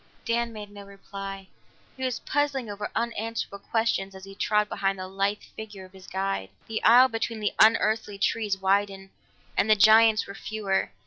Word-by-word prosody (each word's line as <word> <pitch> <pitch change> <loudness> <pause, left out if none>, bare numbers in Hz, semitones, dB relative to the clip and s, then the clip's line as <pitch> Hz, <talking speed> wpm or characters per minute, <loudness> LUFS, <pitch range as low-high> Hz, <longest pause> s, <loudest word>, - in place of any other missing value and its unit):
Dan 235 0 0
made 210 -2 -9
no 205 0 -10
reply; 195 -1 -8 0.5
he 260 - -7
was 255 -2 -2
puzzling 275 -6 -1
over 205 0 -5
unanswerable 230 -3 -3
questions 220 -4 0
as 190 - -11
he 195 0 -10
trod 210 +1 +1
behind 195 -1 -1
the 185 0 -6
lithe 195 +2 -1
figure 210 -3 -9
of 185 - -18
his 190 -1 -14
guide. 190 - -2 0.2
The 220 0 -4
aisle 245 +3 +8
between 225 -1 -3
the 210 - -1
unearthly 220 -2 +3
trees 205 -1 0
widened, 195 0 0 0.4
and 220 - +1
the 215 - +7
giants 220 +1 +6
were 200 - -9
fewer. 205 -2 -2
205 Hz, 175 wpm, -26 LUFS, 195-225 Hz, 0.5 s, aisle